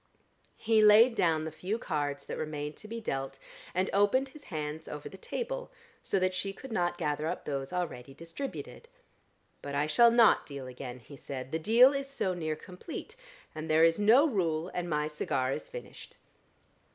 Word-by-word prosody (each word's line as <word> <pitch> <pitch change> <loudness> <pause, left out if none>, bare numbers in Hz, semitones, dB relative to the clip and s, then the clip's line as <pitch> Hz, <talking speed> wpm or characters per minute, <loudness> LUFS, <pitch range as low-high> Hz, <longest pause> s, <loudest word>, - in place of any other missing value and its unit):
He 220 -1 +3
laid 215 +3 +7
down 160 -7 +1
the 160 - -4
few 185 +7 -3
cards 145 -8 -2
that - - -6
remained 150 -1 -4
to 215 - -11
be 230 +1 -5
dealt, 135 -9 -4 0.4
and 185 +2 +2
opened 205 +7 +3
his 295 +2 -15
hands 155 -2 -5
over 150 -1 -6
the - - -10
table, - - -4 0.3
so - - -1
that 185 0 +1
she 195 +2 -3
could 260 +5 -11
not 175 -4 0
gather 150 -1 -1
up 175 - -4
those 135 -2 -3
already 155 -8 -4
distributed. 270 - -7 0.7
"But 140 0 -5
I 145 +1 +2
shall 235 +10 +6
not 230 -1 +5
deal 140 -2 -7
again," 125 0 -7
he 140 - -13
said, 135 -1 -7
"the 160 - -1
deal 235 - +6
is 275 0 -3
so 195 -9 -1
near 160 -3 -2
complete. 185 - -9 0.4
And 155 0 -6
there 160 +1 +6
is 165 +2 +3
no 235 +9 +6
rule, 170 - 0
and 175 -1 -3
my 150 -1 0
cigar 135 -4 -1
is - - -6
finished." - - -10
170 Hz, 185 wpm, -30 LUFS, 150-220 Hz, 0.7 s, laid